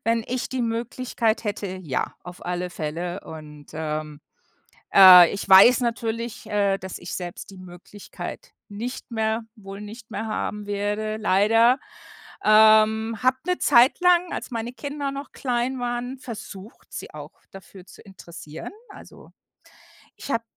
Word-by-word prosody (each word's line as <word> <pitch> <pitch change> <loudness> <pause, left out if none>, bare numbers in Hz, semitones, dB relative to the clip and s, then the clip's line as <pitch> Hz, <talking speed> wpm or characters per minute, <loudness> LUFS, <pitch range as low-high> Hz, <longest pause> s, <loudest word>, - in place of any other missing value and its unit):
wenn 230 0 +1
ich 255 0 -3
die 260 -1 -3
Möglichkeit 230 0 -2
hätte, 200 -3 -4
ja. 135 -4 -3
Auf 180 0 -11
alle 180 0 -3
Fälle. 175 +3 -5
Und, 150 -2 -11
ähm, 155 -1 -5 0.7
äh, 180 -3 +9
ich 200 0 -5
weiß 195 +6 +8
natürlich, 230 -1 -3
äh, 200 -2 +1
dass 190 0 -8
ich - - -7
selbst 175 +1 -7
die 195 - -13
Möglichkeit 185 - -10
nicht 235 +4 -7
mehr 220 0 -1
wohl 195 -2 -10
nicht 220 +3 -11
mehr 220 - -4
haben 210 -1 -4
werde, 205 +1 -2
leider, 225 +5 +3 0.7
ähm 220 +1 +5
habe 255 +1 +3
'ne 360 0 0
Zeit 250 +3 +4
lang, 355 0 +3
als - - -5
meine 235 0 -4
Kinder 280 +3 -5
noch 280 +1 -7
klein 250 0 -2
waren, 245 +1 -4
versucht, 220 -4 -10
sie - - -8
auch - - -9 0.2
dafür 190 0 -13
zu - - -16
interessieren. 170 -5 -11 0.2
Also, 405 - -15 0.9
ich - - -9
habe 230 0 -1
215 Hz, 145 wpm, -24 LUFS, 190-240 Hz, 0.9 s, äh